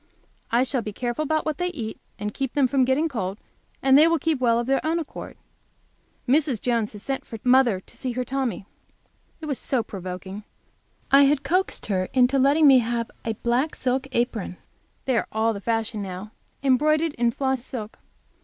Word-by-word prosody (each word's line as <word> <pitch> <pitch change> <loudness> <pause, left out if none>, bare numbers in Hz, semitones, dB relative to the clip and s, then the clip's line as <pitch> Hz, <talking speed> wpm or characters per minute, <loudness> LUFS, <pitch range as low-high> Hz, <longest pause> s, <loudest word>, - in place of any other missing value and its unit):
I 240 +2 +3
shall 260 -1 0
be 210 -2 -6
careful 240 +5 -3
about 310 +1 0
what 310 -2 -2
they 355 - 0
eat, 235 -11 -5 0.2
and 210 0 -4
keep 270 -2 -3
them 280 -3 +3
from 260 0 +2
getting 265 +5 +2
cold, 200 - -3 0.5
and 265 0 +5
they 305 +3 +8
will 335 0 +3
keep 320 -3 0
well 235 -2 +3
of 235 - -1
their 270 +2 +1
own 320 +2 +1
accord. 325 -3 -7 0.9
Mrs. 275 -3 +2
Jones 230 -3 0
has 210 - -9
just - - -11
sent 270 -1 -2
for 225 - -8
mother 250 -5 +4
to - - -17
see 255 -2 -4
her 250 +1 -2
Tommy. 260 -6 -2 0.8
It - - -6
was 285 -4 -2
so 255 -4 0
provoking. 190 0 -7 0.7
I 280 +1 +7
had 280 0 +2
coaxed 365 +7 0
her 185 -3 0
into 260 +1 +4
letting 285 +4 +4
me 270 -3 +8
have 235 0 -2
a 225 - -1
black 250 +6 +1
silk 260 +1 -1
apron; 235 -7 -2 0.5
they 255 -3 +2
are - - -4
all 220 +1 +1
the 200 - -7
fashion 225 0 -1
now, 190 +2 -6 0.3
embroidered 305 +4 +3
in 235 -2 +1
floss 265 0 -1
silk. 220 -5 -7
255 Hz, 195 wpm, -24 LUFS, 225-275 Hz, 0.9 s, they